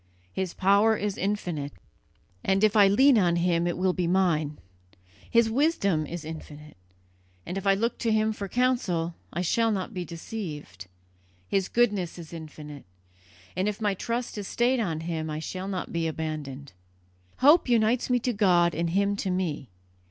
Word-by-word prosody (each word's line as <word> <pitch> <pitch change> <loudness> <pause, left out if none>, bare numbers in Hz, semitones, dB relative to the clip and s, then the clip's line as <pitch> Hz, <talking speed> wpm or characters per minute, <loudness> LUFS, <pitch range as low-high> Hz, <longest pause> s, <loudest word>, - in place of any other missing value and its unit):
His 190 -2 -3
power 200 +3 +4
is 205 -1 -2
infinite, 175 -8 -3 0.7
and 195 +1 +2
if 215 0 +4
I 205 -2 +7
lean 255 +5 +5
on 175 -3 +2
Him 170 0 +1
it 175 - -2
will 185 0 +1
be 180 -2 -1
mine; 170 -5 +1 0.7
His 235 -1 +4
wisdom 220 - +1
is 170 0 -6
infinite, 150 -1 -9 0.7
and 180 - -5
if 195 0 -3
I 195 - +5
look 230 +4 -1
to 230 - 0
Him 220 0 +2
for 200 -2 -5
counsel 190 -8 0 0.2
I 175 - -2
shall 225 +6 +2
not 200 +2 -3
be 180 -2 -3
deceived; 160 - -7 0.6
His 190 - 0
goodness 205 -8 +1
is 170 -1 -10
infinite, 150 -3 -9 0.7
and 185 +3 0
if 210 - -5
my 210 -2 +1
trust 230 +3 -3
is 200 - -5
stayed 245 +2 +1
on 165 -8 -2
Him 160 -1 -3
I 155 - -3
shall 185 +4 -5
not 190 -2 -4
be 165 -1 0
abandoned. 150 -4 -5 0.6
Hope 295 +1 +5
unites 235 +1 +2
me 250 - +3
to 245 +1 0
God 175 -5 +3
and 165 +2 -1
Him 200 +3 +1
to 195 - -2
me. 175 - -2
185 Hz, 170 wpm, -27 LUFS, 165-215 Hz, 0.7 s, I